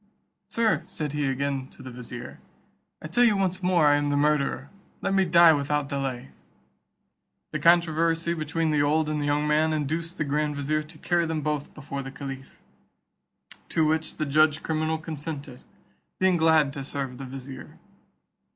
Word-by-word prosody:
"Sir," 230 -1 +1
said 150 -2 -4
he 150 -1 -1
again 135 0 -2
to - - -14
the 130 - -8
vizier, 125 0 -8 0.6
"I - - -4
tell 240 +10 +3
you 220 -4 +4
once 190 -1 -1
more 180 -3 +3
I 145 0 +5
am 145 0 0
the 145 0 +1
murderer; 145 -1 +1 0.3
let 195 - -1
me 195 -1 +3
die 170 -1 +7
without 145 0 0
delay." 135 - -3 1.2
The 150 - -2
controversy 165 0 +3
between 160 0 -1
the 150 -1 +2
old 150 +2 +2
and 150 -1 -1
the 145 - -1
young 145 +1 +1
man 155 +1 +2
induced 160 +3 -2
the - - 0
grand 150 +1 -1
vizier 150 +2 0
to 155 +1 -13
carry 170 +1 0
them 160 -1 -2
both 150 -1 -3
before 140 -2 -5
the 135 - -7
caliph, 135 -1 -9 1.1
to 160 - +2
which 160 +1 0
the 155 - -1
judge 155 +2 +3
criminal 160 0 0
consented, 150 -4 -7 0.6
being 185 -1 +3
glad 160 -4 +4
to 140 -2 -5
serve 135 -2 -5
the 135 - -6
vizier. 130 0 -9
150 Hz, 170 wpm, -26 LUFS, 140-160 Hz, 1.2 s, die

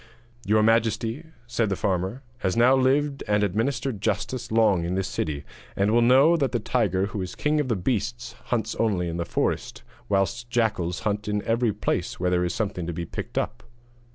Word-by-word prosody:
'Your 110 +1 +4
majesty,' 115 +5 +1 0.2
said 120 -3 0
the 95 - 0
farmer, 95 +8 -1 0.2
'has 95 -5 -1
now 125 +3 +6
lived 135 +2 +1
and 105 0 +2
administered 115 +3 -1
justice 125 +2 -2
long 110 -6 +3
in 85 +2 -2
this 95 0 -1
city, 75 -5 -3 0.3
and 100 +2 +2
will 120 +1 +4
know 135 +8 +6
that 140 -5 0
the 120 - +1
tiger 105 -5 +1
who 100 0 -4
is 95 - -5
king 150 0 +1
of 115 -10 -2
beasts 120 0 -2
hunts 110 -3 -1
only 100 -6 +1
in 85 0 -3
the 85 - -2
forest, - - -2 0.3
whilst 110 +5 0
jackals 110 -7 0
hunt 105 -1 -2
in 105 0 -1
every 115 0 +1
place 95 -3 -2
where 90 0 +1
there 90 0 +2
is 90 - 0
something 100 -6 -2
to 85 - -3
be 85 +1 -4
picked - - -7
up.' - - -2
110 Hz, 190 wpm, -25 LUFS, 95-120 Hz, 0.3 s, now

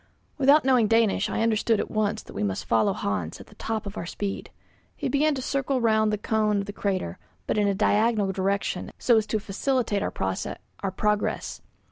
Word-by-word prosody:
Without 280 +1 +5
knowing 250 -4 +4
Danish 225 -2 +2
I - - 0
understood 225 -1 +2
at - - -3
once 215 -1 0
that - - -12
we - - -4
must 100 -2 -2
follow 110 -2 +3
Hans 95 -5 -3
at - - -11
the - - -18
top 220 -2 -2
of 200 +1 -7
our 170 - -4
speed. 200 +2 -4 0.5
He - - -3
began 295 +1 +2
to 260 - -4
circle 275 0 0
round 220 -2 +3
the 210 - 0
cone 215 0 +1
of 200 - -1
the 205 - -7
crater, 185 - -2 0.3
but - - -1
in 205 - +3
a 200 - +1
diagonal 210 0 +2
direction 195 -1 -2
so 235 -2 +4
as 215 -1 +1
to 215 - 0
facilitate 215 +1 -1
our - - -1
progress. 195 - -2
210 Hz, 195 wpm, -26 LUFS, 195-230 Hz, 0.5 s, Without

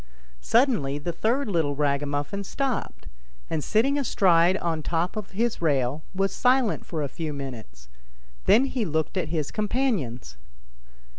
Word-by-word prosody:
Suddenly 225 - +2
the 150 +4 -3
third 235 +10 0
little 160 -7 0
ragamuffin 145 +6 -1
stopped, 265 +4 -3 0.5
and 155 -2 -1
sitting 270 +7 +2
astride 185 -8 +4
on 165 -3 -1
the - - -8
top 170 +3 0
of 210 -2 -5
his 230 +2 -1
rail, 140 -2 +1
was 195 +1 0
silent 250 -3 +2
for 160 -3 -3
a - - -1
few 155 +3 -5
minutes; 115 - -8 0.6
then 245 +5 +5
he 260 -3 -2
looked 160 -3 -1
at 185 - -1
his 155 -4 -2
companions. 200 - -1
170 Hz, 145 wpm, -26 LUFS, 145-220 Hz, 0.6 s, then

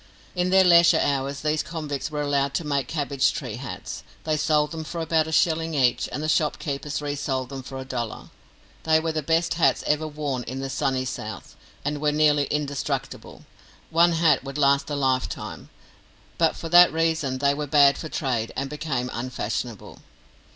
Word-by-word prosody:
In 180 0 0
their 190 0 +6
leisure 170 -1 +6
hours 140 -1 -1
these 155 0 0
convicts 150 -4 -4
were 150 -1 -3
allowed 140 -1 0
to - - 0
make 140 -3 -1
cabbage 140 -2 0
tree 125 -6 -5
hats. 130 0 -7 0.2
They 155 -1 0
sold 150 -1 +1
them 160 -1 -5
for 170 +2 -6
about 160 -1 +1
a - - -5
shilling 160 0 +1
each, 125 -4 +2
and 150 - -4
the - - -1
shop 155 -1 +1
keepers 150 0 -4
resold 140 -3 -2
them 135 -1 -6
for 135 +1 -8
a 130 - -6
dollar. 120 -4 -5 0.5
They 160 0 +3
were 160 0 -2
the 155 -1 -2
best 165 +3 +1
hats 140 -6 +2
ever 150 +1 +1
worn 145 -4 -3
in 130 +2 -5
the 135 0 -4
Sunny 130 -1 -1
South, 110 -4 -7 0.3
and 145 0 -2
were 150 -1 +2
nearly 150 -1 +3
indestructible; 145 -1 -4 0.5
one 170 +1 +4
hat 160 -5 +3
would 135 +1 -6
last 140 0 +3
a 145 - -2
lifetime, 130 -2 -2 0.7
but - - +3
for - - -6
that 175 +1 +8
reason 160 -4 0
they 140 +1 +2
were 150 +1 -4
bad 140 -1 +5
for 160 - -7
trade, 120 -7 -2
and 135 +1 -3
became 150 -5 -2
unfashionable. 120 -2 -5
145 Hz, 185 wpm, -24 LUFS, 135-155 Hz, 0.7 s, that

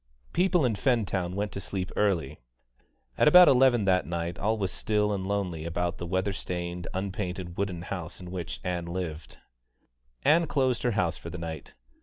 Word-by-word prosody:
People 180 -3 +3
in 120 - +2
Fentown 100 -6 0
went 105 +1 -2
to 100 - -5
sleep 95 -1 -4
early. 85 -9 0 0.8
At - - +5
about 180 +4 +9
eleven 125 -4 +5
that 90 -6 +2
night 85 0 -3
all 110 +2 +1
was 95 -5 -1
still 105 +4 0
and 95 -1 -3
lonely 95 -6 -2
about 85 +1 -2
the 85 - -4
weather 95 +3 0
stained, 90 -1 -4
unpainted 95 -2 -4
wooden 95 -4 -2
house 90 -3 -6
in 90 -1 -9
which 85 -10 -5
Ann 90 -1 -2
lived. 85 -3 -5 0.9
Ann 165 +2 +5
closed 130 -4 +1
her 120 - +1
house 90 -4 +1
for 85 - -8
the 90 - -6
night. 80 -3 -7
95 Hz, 175 wpm, -28 LUFS, 85-105 Hz, 0.9 s, about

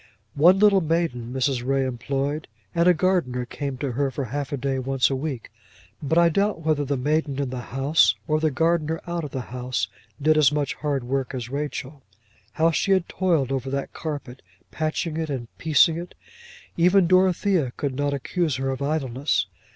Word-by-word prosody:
One 175 +6 +6
little 200 -1 +5
maiden 160 -8 -1
Mrs. 130 -1 0
Ray 135 +1 +1
employed, 135 +4 -2 0.3
and 170 +1 +3
a 180 - +7
gardener 155 -9 0
came 140 +1 -5
to 135 0 -3
her 140 +3 0
for 135 0 -4
half 140 +4 -4
a 140 - -1
day 135 0 -1
once 135 +1 +1
a - - +1
week; 130 -5 -5 0.5
but 150 +2 0
I 170 0 +6
doubt 200 +2 0
whether 155 -2 +1
the 140 0 -1
maiden 145 +1 0
in 135 -3 -2
the 125 -1 -4
house, 135 +5 +2
or 155 0 +2
the 155 0 +2
gardener 160 +2 0
out 170 -1 -3
of 150 - -5
the 130 - -4
house, 125 -5 -2 0.3
did 155 +1 +3
as 145 -2 +5
much 145 -3 -1
hard 145 -4 -2
work 135 +1 -2
as 120 -2 -5
Rachel. 140 -1 -4 0.5
How 165 +1 +3
she 195 +4 +2
had 185 -3 +1
toiled 165 -8 0
over 135 0 -2
that 140 0 -3
carpet, 140 -5 -6 0.3
patching 155 0 -2
it 160 -1 -2
and 125 -5 -5
piecing 160 +1 +4
it! 175 +1 -9 0.6
Even 180 +2 +5
Dorothea 185 -4 +3
could 140 -2 -2
not 145 +2 -1
accuse 150 +2 -1
her 135 +1 -1
of 130 - -5
idleness. 135 -8 0
145 Hz, 190 wpm, -24 LUFS, 130-160 Hz, 0.6 s, a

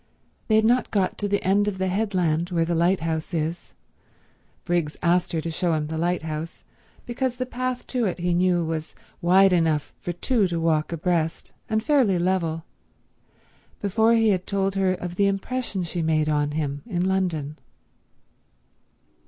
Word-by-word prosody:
They 220 - +3
had 220 0 +4
not 245 +2 +3
got 195 -3 0
to 205 - -1
the 200 0 0
end 200 +2 +2
of 200 -2 -2
the 190 0 -1
headland 180 -4 0
where 170 -3 +1
the 170 - -1
lighthouse 165 -1 0
is—Briggs 165 0 -5
asked 175 +1 +2
her 165 -2 -1
to 165 +1 -4
show 170 +1 0
him 150 -1 -1
the 160 +1 -4
lighthouse, 165 -2 -3 0.4
because 250 +1 -2
the 255 +1 -3
path 255 0 -3
to 250 -3 -1
it, 185 - -1
he 175 0 0
knew, 175 -1 +2
was 160 -1 -4 0.3
wide 185 +2 +5
enough 160 -4 +1
for 175 - -4
two 205 +4 +1
to 170 -1 -2
walk 160 -1 +1
abreast 165 -1 -1 0.2
and 220 0 0
fairly 260 - +3
level—before 185 +5 -3
he 225 -1 +4
had 185 -3 0
told 195 -1 0
her 190 -1 +1
of 180 -1 -6
the 200 - +4
impression 200 0 -2
she 170 +1 -3
made 155 -1 +1
on 145 -1 0
him 145 -2 -2
in 180 -5 -1
London. 170 -6 -1
180 Hz, 160 wpm, -24 LUFS, 165-200 Hz, 0.4 s, wide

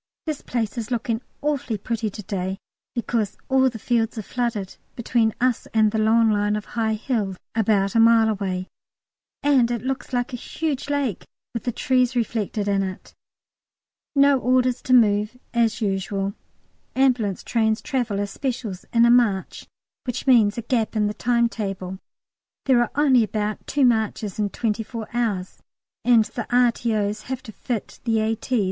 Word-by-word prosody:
This 310 -3 -3
place 235 -1 -2
is 225 0 -5
looking 230 -1 -1 0.2
awfully 285 -6 -1
pretty 225 +1 -2
to 210 +1 -9
day, 190 -1 -3 0.4
because 230 -3 -1
all 265 0 +4
the 235 - -8
fields 230 0 0
are 220 - -3
flooded 230 -5 -3 0.2
between 235 -1 +1
us 250 -1 +1
and 215 -1 +4
the 220 - 0
long 225 +1 +4
line 205 0 +1
of 210 0 -4
high 220 -2 +1
hills 210 -5 -2 0.2
about 205 -3 +2
a 230 - +3
mile 225 0 +6
away, 190 -3 -2 0.8
and 270 -5 +4
it 240 -1 -2
looks 265 0 -3
like 245 0 -1
a - - -2
huge 290 +2 -3
lake 280 -9 -1 0.3
with 230 - -5
the 245 - +1
trees 255 0 +1
reflected 220 -3 -1
in 200 -1 +2
it. 190 -1 -6 1.0
No 280 -1 +5
orders 255 0 +2
to 255 - +2
move, 215 -1 +4 0.2
as 235 -1 +1
usual. 195 -1 -1 0.6
Ambulance 245 -7 +2
trains 220 -2 +1
travel 245 -8 -2
as 200 0 -2
"specials" 240 -8 -4
in 235 0 +5
a 235 - +5
"marche," 220 -6 +2 0.4
which 245 -2 -3
means 230 -6 +5
a 235 - -3
gap 230 -2 0
in 210 -1 +2
the 210 - -1
timetable. 210 -6 -1 0.7
There 255 -3 +4
are 240 - +1
only 270 -5 +5
about 215 -1 -3
two 280 -1 +2
marches 220 -4 0
in 205 -1 +1
twenty 220 0 -1
four 225 0 -6
hours, 210 -6 -2 0.4
and 235 -3 +5
the 225 +2 -6
R.T.O.'s 230 -4 +1
have 260 -1 -3
to 230 - -9
fit 230 0 -5
the 225 -2 +1
A.T.' 225 +3 0
230 Hz, 165 wpm, -23 LUFS, 210-245 Hz, 1.0 s, mile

